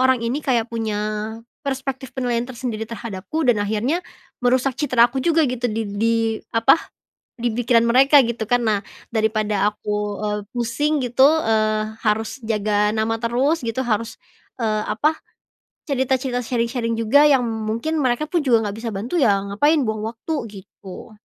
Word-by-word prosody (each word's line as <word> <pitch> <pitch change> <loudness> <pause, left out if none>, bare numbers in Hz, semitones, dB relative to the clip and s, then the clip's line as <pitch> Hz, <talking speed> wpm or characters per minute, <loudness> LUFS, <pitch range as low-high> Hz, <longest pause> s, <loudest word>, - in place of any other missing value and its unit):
orang 260 -1 +3
ini 255 +6 -1
kayak 245 -5 +1
punya 225 -2 -2 0.7
perspektif 265 -1 -3
penilaian 245 -2 0
tersendiri 235 -3 -4
terhadapku 230 +6 -4
dan 235 -4 +3
akhirnya 220 - 0 0.4
merusak 255 +2 +2
citra 255 -5 +4
aku 265 +2 -2
juga 325 0 +3
gitu 245 0 -2
di 220 +1 -2
di 225 +3 +1 0.4
apa? 230 +4 +6 0.6
Di 240 0 -1
pikiran 235 0 +3
mereka 270 +4 +6
gitu 230 -1 -3
kan 245 +2 +2
nah 215 -2 +2 0.4
daripada 215 -2 +1
aku, 210 0 -5 0.3
eee, 210 0 -1
pusing 270 +5 0
gitu, 250 +2 +4 0.2
eee, 215 0 0
harus 220 +4 0
jaga 210 -1 +1
nama 220 +1 0
terus 260 +8 +1
gitu 230 +3 -1
harus, 225 0 -1 0.5
eee, 215 -1 0
apa? 300 +9 +1 0.7
Cerita-cerita 260 -2 0
sharing-sharing 235 -1 -1
juga 275 +7 +5
yang 265 -3 +4
mungkin 225 +7 -2
mereka 255 +2 +1
pun 345 - +2
juga 235 -4 +3
nggak 200 - -5
bisa 230 0 -4
bantu 230 - -4
ya 200 -5 +3
ngapain 290 +8 +3
buang 220 -2 -2
waktu 230 +8 -5 0.3
gitu. 190 +4 -12
235 Hz, 155 wpm, -21 LUFS, 220-260 Hz, 0.7 s, apa